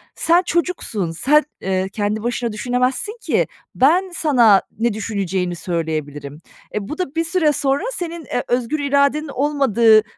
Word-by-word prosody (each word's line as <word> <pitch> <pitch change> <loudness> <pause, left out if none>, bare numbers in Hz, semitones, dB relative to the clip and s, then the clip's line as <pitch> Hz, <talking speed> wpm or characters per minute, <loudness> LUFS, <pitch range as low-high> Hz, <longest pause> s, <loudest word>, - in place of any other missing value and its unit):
"Sen 340 +2 +3
çocuksun, 335 - -1
sen, 295 - +3 0.2
eee, 190 0 -1
kendi 210 +1 -2
başına 240 -1 -1
düşünemezsin 250 - -1
ki. - - +1 0.3
Ben, 350 +8 +3
sana 240 - +4 0.2
ne 235 -2 +1
düşüneceğini 195 -4 -2
söyleyebilirim." 155 -4 -4 0.4
E, 205 -1 -3
bu 305 - -5
da 325 -5 -4
bir 330 - +1
süre 330 -3 +2
sonra 275 +4 0
senin, 340 - -5
eee, 245 - -2
özgür 250 +5 0
iradenin 280 +2 +2
olmadığı 250 -6 +3
245 Hz, 140 wpm, -20 LUFS, 200-300 Hz, 0.4 s, sana